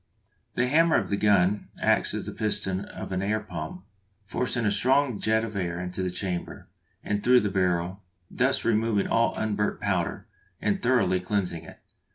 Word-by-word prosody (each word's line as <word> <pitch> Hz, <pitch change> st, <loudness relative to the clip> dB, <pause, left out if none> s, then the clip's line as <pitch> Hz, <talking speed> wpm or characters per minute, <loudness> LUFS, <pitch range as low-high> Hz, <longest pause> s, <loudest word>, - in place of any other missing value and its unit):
The 120 Hz, -, +2 dB
hammer 160 Hz, +4 st, +4 dB
of 100 Hz, -4 st, 0 dB
the -, -, +3 dB
gun 100 Hz, -1 st, +2 dB
acts -, -, +2 dB
as -, -, -3 dB
the -, -, -4 dB
piston 105 Hz, -3 st, -2 dB
of -, -, -8 dB
an 95 Hz, 0 st, -1 dB
air 105 Hz, +2 st, 0 dB
pump, 110 Hz, -, -7 dB, 0.4 s
forcing 120 Hz, +3 st, -1 dB
a 105 Hz, -, +3 dB
strong 130 Hz, +3 st, +2 dB
jet 110 Hz, 0 st, +2 dB
of 110 Hz, -2 st, -5 dB
air 90 Hz, -3 st, -2 dB
into 90 Hz, +1 st, -4 dB
the 90 Hz, -, -1 dB
chamber, 90 Hz, -1 st, -4 dB, 0.4 s
and 105 Hz, 0 st, -2 dB
through 125 Hz, 0 st, +6 dB
the 105 Hz, -, -1 dB
barrel, 90 Hz, 0 st, 0 dB, 0.3 s
thus -, -, 0 dB
removing 110 Hz, -2 st, +2 dB
all 115 Hz, 0 st, +2 dB
unburnt 105 Hz, -1 st, -1 dB
powder, -, -, -1 dB, 0.3 s
and 105 Hz, -1 st, 0 dB
thoroughly 120 Hz, -7 st, +2 dB
cleansing 90 Hz, -3 st, -2 dB
it. -, -, -13 dB
105 Hz, 175 wpm, -26 LUFS, 95-115 Hz, 0.4 s, through